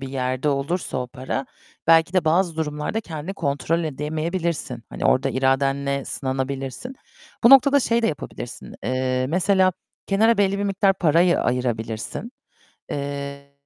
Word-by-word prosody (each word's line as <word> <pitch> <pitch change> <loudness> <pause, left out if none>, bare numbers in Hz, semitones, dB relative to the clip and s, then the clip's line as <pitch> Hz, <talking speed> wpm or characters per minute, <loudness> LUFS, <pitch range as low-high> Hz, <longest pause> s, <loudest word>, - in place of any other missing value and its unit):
bir 135 - -5
yerde 130 +1 -1
olursa 140 +2 -1
o 125 - -3
para, 130 - -4 0.4
belki 165 +1 +5
de 185 -3 +2
bazı 170 +1 +2
durumlarda 150 +6 -2
kendini 165 -1 -6
kontrol 165 +1 -1
edemeyebilirsin. 155 -2 -3
Hani - - -6
orada 135 +1 +3
iradenle 135 +1 +1
sınanabilirsin. 135 - -4 0.5
Bu 235 - +8
noktada 275 +1 +7
şey 235 -2 +1
de - - +3
yapabilirsin, 150 - -6
eee, 130 +1 0
mesela 185 +3 +3 0.3
kenara 220 +3 +3
belli 200 0 +2
bir 200 - -1
miktar 195 0 +2
parayı 175 +1 +3
ayırabilirsin. 120 - -2 0.6
Eee 140 0 -5
150 Hz, 130 wpm, -23 LUFS, 135-185 Hz, 0.6 s, Bu